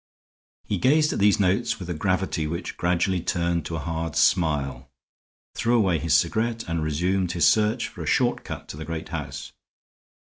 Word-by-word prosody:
He 100 - -2
gazed 150 - +3
at - - -3
these 100 +1 +4
notes 100 +4 +1
with 90 - -7
a 90 - -2
gravity 90 -1 -1
which 85 +4 -5
gradually 90 +1 0
turned 85 -2 -1
to 85 - -4
a - - -2
hard 80 -2 -3
smile, 70 -7 +1 0.6
threw 120 +1 +1
away 95 -7 +2
his 80 0 +2
cigarette, 110 +8 +1
and 85 -1 -1
resumed 90 +4 0
his 85 - +3
search 110 +2 +2
for - - -10
a - - -5
short - - +1
cut - - -7
to - - -7
the 80 - -6
great 80 0 -5
house. 80 -4 -6
85 Hz, 180 wpm, -25 LUFS, 80-100 Hz, 0.6 s, these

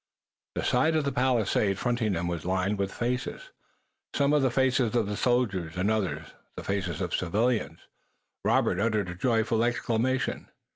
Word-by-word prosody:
The - - -2
side 155 +6 +2
of 155 - +2
the 140 - -1
palisade 115 -6 +1
fronting 120 -3 0
them 85 0 -2
was 85 -2 -3
lined 95 +3 0
with 100 -1 -1
faces, 125 - -3 0.6
some 140 0 +3
the 145 -3 +3
faces 125 -2 +1
of 105 -3 0
soldiers 100 -10 0
and 95 +4 +1
others 80 -9 -2 0.2
the - - -5
faces 95 -5 -2
of - - -2
civilians. 105 - 0 0.6
Robert 90 - +2
uttered 105 -3 0
a - - -4
joyful 115 +3 +1
exclamation. 120 +1 -1
110 Hz, 150 wpm, -28 LUFS, 95-125 Hz, 0.6 s, some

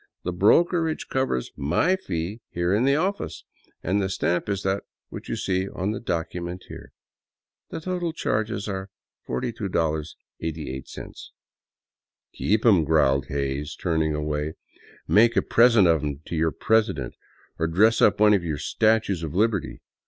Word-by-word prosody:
The 90 - -2
brokerage 160 - +2
covers 130 - -1
my 85 - +2
fee 95 - -4
here 85 +2 0
in 110 +5 +2
the 140 +1 +4
office, 190 +6 -2 0.4
and 100 +4 +1
the 95 - -1
stamp 90 0 -1
is 100 -1 -2
that 95 +1 0 0.3
which - - -9
you - - -1
see 95 +1 -1
on 95 +3 -2
the 110 - -4
document 90 -1 -4
here. - - -10 0.8
The - - -6
total 175 -1 -2
charges 110 -9 -2
are 95 -1 -4 0.4
$42.88." 80 - -4 0.5
" - - -69
Keep 110 +3 0
'em," 100 -8 +6
growled 70 -3 +2
Hays, 70 +2 -3
turning 80 -3 0
away. 75 +1 -2 0.3
" - - -24
Make 115 +2 +5
a - - +4
present 115 -5 +5
of 80 -3 +3
them 75 -1 -4
to - - -5
your 80 0 +1
president, 105 - +1 0.5
or 80 - +1
dress 110 +8 +3
up 105 - +4
one 105 0 +6
of 95 -4 +2
your 80 -3 -2
statues 110 +1 +1
of 80 -1 -5
Liberty." 105 -1 0
95 Hz, 150 wpm, -25 LUFS, 80-110 Hz, 0.8 s, em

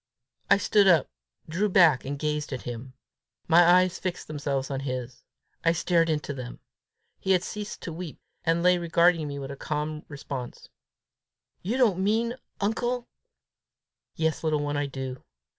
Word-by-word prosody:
I - - +7
stood 200 +1 +3
up, 170 -6 +4 0.4
drew 185 +6 0
back, 170 -8 +5
and 140 +1 -3
gazed 150 0 -2
at 130 - -4
him. 125 +2 -7 0.5
My 170 +1 +7
eyes 180 +1 +4
fixed 185 -2 -4
themselves 140 -2 -3
on 135 - -2
his. 130 -2 -5 0.4
I 165 - +4
stared 170 -1 +2
into 150 -2 -1
them. 125 -2 -7 0.6
He 190 - +2
had 180 -1 +2
ceased 210 +1 -6
to 165 - -5
weep, 170 -2 -7 0.2
and 165 +1 +1
lay 180 0 +5
regarding 170 -1 +3
me 140 0 -5
with 140 0 -6
calm 150 0 -3
response. 140 -3 -7 0.9
"You 220 +8 -1
don't 220 -8 +3
mean, 220 +4 +1 0.3
uncle, 240 +4 -1 0.5
?" - - -64 0.3
"Yes, 160 0 -1
little 155 -2 +1
one, 145 0 -2
I 145 0 0
do. 130 -1 -6
160 Hz, 160 wpm, -27 LUFS, 140-180 Hz, 0.9 s, I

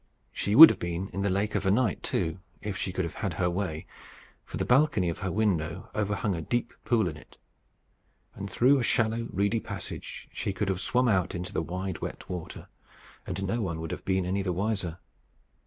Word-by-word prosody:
She 100 - -1
would 160 +6 +13
have - - -5
been 85 +2 -3
in 100 - -4
the 100 - +1
lake 100 +3 0
of 105 - 0
a 95 - +2
night, 110 +1 +2
too, 80 +3 -1 0.2
if 105 -2 -4
she 95 - -3
could 95 -1 -1
have 85 - -6
had - - -1
her 90 -1 0
way; 85 -4 -3 0.6
for - - -6
the - - -1
balcony 125 - +3
of 85 - -4
her 95 -1 -2
window 90 -4 -1
overhung 105 -1 -1
a 80 - -4
deep 120 +8 -2
pool 110 -3 +2
in 75 -3 -5
it; - - -17 1.0
and 100 - -6
through 135 +6 +4
a - - 0
shallow 115 0 +1
reedy 100 +3 +1
passage - - -7
she 100 - -2
could 100 0 -1
have 95 0 -1
swum 125 +3 +2
out 95 -5 +1
into 90 0 -5
the - - 0
wide 90 +2 -4
wet - - -6
water, 90 -3 -7 0.6
and 95 +1 -3
no 115 +5 -1
one 85 -5 -2
would 80 -1 -5
have - - -5
been 95 -1 0
any 95 +2 0
the 95 -2 -1
wiser. 95 -2 -2
95 Hz, 210 wpm, -28 LUFS, 90-110 Hz, 1.0 s, would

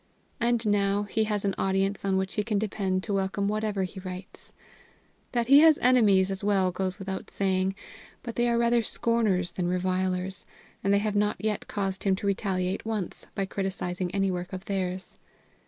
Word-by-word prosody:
And 235 -1 +1
now 205 -1 +2
he 215 +2 0
has 210 -2 -1
an 195 - +1
audience 195 +1 0
on 195 -1 +1
which 190 0 -2
he 210 - 0
can 210 -1 0
depend 195 -3 -1
to 205 - -3
welcome 195 +1 0
whatever 210 -1 -1
he 185 +1 -6
writes. 185 +1 -8 0.8
That 240 -2 +1
he 275 +4 +8
has 315 -1 +7
enemies 205 -7 +4
as 195 +1 -4
well 195 -3 +2
goes 185 +1 -2
without 195 -1 -5
saying, 190 0 0 0.5
but 235 -2 -6
they 240 0 +2
are 235 - +2
rather 235 0 +3
scorners 215 -6 0
than 175 0 -2
revilers, 185 +1 -1 0.4
and 195 - +2
they 200 - +5
have 210 0 -1
not 210 0 +2
yet 210 -1 -2
caused 195 -2 -2
him 195 -2 +3
to 200 - -6
retaliate 190 -1 -1
once 215 -5 -4
by 195 - 0
criticising 190 -2 -3
any 195 +1 0
work 180 +1 -4
of 185 0 -6
theirs. 185 -1 -3
195 Hz, 185 wpm, -27 LUFS, 190-210 Hz, 0.8 s, he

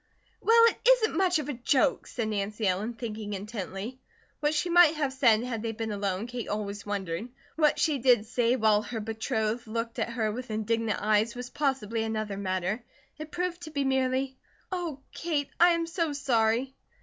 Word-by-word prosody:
"Well, 460 +1 +6
it 465 - +2
isn't - - +4
much 360 -1 +3
of 300 -3 -3
a 295 - -2
joke," 260 +3 +1
said 230 -3 -3
Nancy 210 +1 -2
Ellen, 200 +5 0
thinking 215 -3 -5
intently. 205 +3 -5 0.4
What 300 0 +1
she 300 - +1
might 345 -2 +6
have 285 -3 -1
said 235 -4 +4
had 240 -3 -3
they 225 0 -3
been 225 0 -4
alone, 200 0 -2
Kate 240 -1 -5
always 205 -1 -4
wondered. 200 +1 -3 0.3
What 305 -2 +3
she 305 -4 +1
did 240 -4 +4
say 240 +1 +1
while 215 -3 +3
her 225 +1 -5
betrothed 220 +1 -2
looked 230 +1 -3
at - - 0
her 220 -3 0
with 250 +3 -6
indignant 220 0 -1
eyes 215 +2 +2
was 245 0 -7
possibly 260 -6 -1
another 215 -2 -2
matter. 190 +3 -2 0.4
It 310 0 -6
proved 355 +1 -3
to 320 - -7
be 285 -2 -1
merely: 265 0 0 0.3
"Oh, 340 -7 -3
Kate, 305 -4 -2
I 350 +1 +8
am 335 0 0
so 330 -2 -1
sorry!" 250 -2 +1
235 Hz, 185 wpm, -28 LUFS, 215-285 Hz, 0.4 s, I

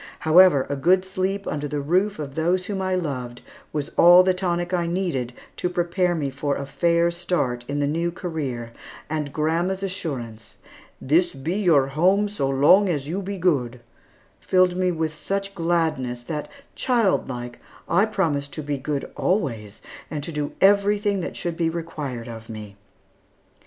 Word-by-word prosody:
However, 160 -4 +6
a 145 - -2
good 180 +7 +3
sleep 190 +1 -2
under 145 0 -3
the 145 0 -3
roof 185 +8 +1
of 145 -3 -6
those 175 +4 0
whom 195 -1 -3
I 185 0 0
loved 130 -8 -4 0.3
was 150 -2 -3
all 175 +1 +8
the 185 0 +3
tonic 175 -1 -2
I 175 -2 +1
needed 170 -9 -2 0.3
to 180 - -1
prepare 175 0 0
me 145 -4 -2
for 140 +1 -2
a 140 - -4
fair 170 +3 +2
start 170 -9 -1
in 140 - -3
the 145 - +1
new 165 +4 -1
career, 145 - -4 0.4
and 150 -3 -2
grandma's 170 +6 0
assurance, 130 - -5 0.4
"This 170 +6 +2
be 145 +5 -3
your 165 -9 +3
home 185 +8 +3
so 140 -10 -2
long 150 +9 +5
as 145 -5 -2
you 180 +6 -2
be 200 +1 -5
good," 135 -9 0 0.6
filled 185 -1 +3
me 185 0 +1
with 160 -2 -2
such 195 +5 -3
gladness 160 -9 -1
that, 150 +3 -5 0.2
childlike, 135 - 0 0.3
I 195 +5 +3
promised 155 -10 -1
to 155 - -5
be 145 -1 -3
good 140 +1 -3
always 115 - -2 0.3
and 150 -2 -4
to 165 - -5
do 150 -2 -3
everything 205 +1 +3
that 175 - -5
should 175 -1 -3
be 165 -1 +1
required 150 -8 -5
of 115 -1 -9
me. 105 -2 -8
165 Hz, 165 wpm, -23 LUFS, 140-185 Hz, 0.6 s, all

